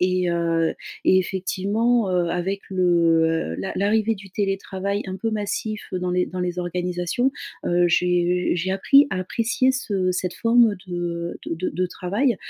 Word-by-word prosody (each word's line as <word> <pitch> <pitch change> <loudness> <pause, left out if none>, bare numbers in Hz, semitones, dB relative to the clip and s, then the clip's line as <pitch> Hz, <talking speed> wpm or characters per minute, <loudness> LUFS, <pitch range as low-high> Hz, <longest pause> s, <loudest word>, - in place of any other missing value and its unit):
Et 180 -1 +1
heu 165 -1 +1 0.3
et 185 - +5
effectivement, 200 +5 0
heu, 175 -2 +1
avec 190 +3 -2
le 165 -3 +2
l'a 190 - -4
l'arrivée 215 +2 +1
du 195 -1 -13
télétravail 195 0 -2
un 185 - -4
peu 225 +3 -2
massif 215 0 -3
dans 180 -1 -2
les 180 0 +1
dans 185 0 -5
les 180 0 -2
organisations, 180 +7 -1 0.4
heu, 175 0 +3
j'ai 180 +1 +2
j'ai 180 +2 -1
appris 275 +9 +5
à - - -1
apprécier 230 +6 +1
ce 200 -8 -1
cette 180 0 -2
forme 230 -2 +4
de 170 -1 -4
de 165 +2 -2
de 185 0 -1
travail. 205 +7 0
185 Hz, 155 wpm, -23 LUFS, 175-205 Hz, 0.4 s, et